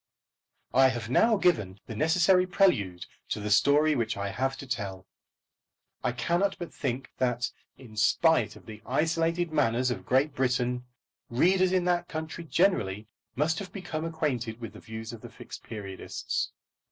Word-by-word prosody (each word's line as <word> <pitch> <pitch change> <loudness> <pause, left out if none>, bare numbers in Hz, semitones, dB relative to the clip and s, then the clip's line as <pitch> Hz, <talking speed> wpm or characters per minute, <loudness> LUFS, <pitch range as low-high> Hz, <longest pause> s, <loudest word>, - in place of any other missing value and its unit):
I 135 +1 +7
have 120 -3 -3
now 225 - +4
given 105 - +1
the 110 - -7
necessary 180 - +4
prelude 100 - +2 0.2
to - - -2
the 105 0 -3
story 145 +8 +5
which 115 -7 -1
I 100 0 -2
have 135 +6 -1
to - - -8
tell. 100 -7 -4 1.0
I 125 - +1
cannot 175 +10 0
but 175 -2 -7
think 130 -2 -3
that, 125 -1 0 0.3
in 115 -5 -13
spite 160 +10 +3
of - - -15
the 110 -1 -10
isolated 165 +5 0
manners 125 -4 +2
of - - -4
Great 135 +4 +3
Britain, 125 -1 0 0.4
readers 185 +9 +3
in 185 -1 +2
that 175 -1 +1
country 160 +1 -5
generally 110 - +1 0.3
must 155 +4 +1
have 190 -3 -7
become 175 -6 -5
acquainted 135 -9 -2
with 115 -5 -7
the 110 - -11
views 110 +1 -7
of 115 - -9
the - - -9
Fixed - - -10
Periodists. 100 -4 -4
130 Hz, 160 wpm, -28 LUFS, 115-165 Hz, 1.0 s, I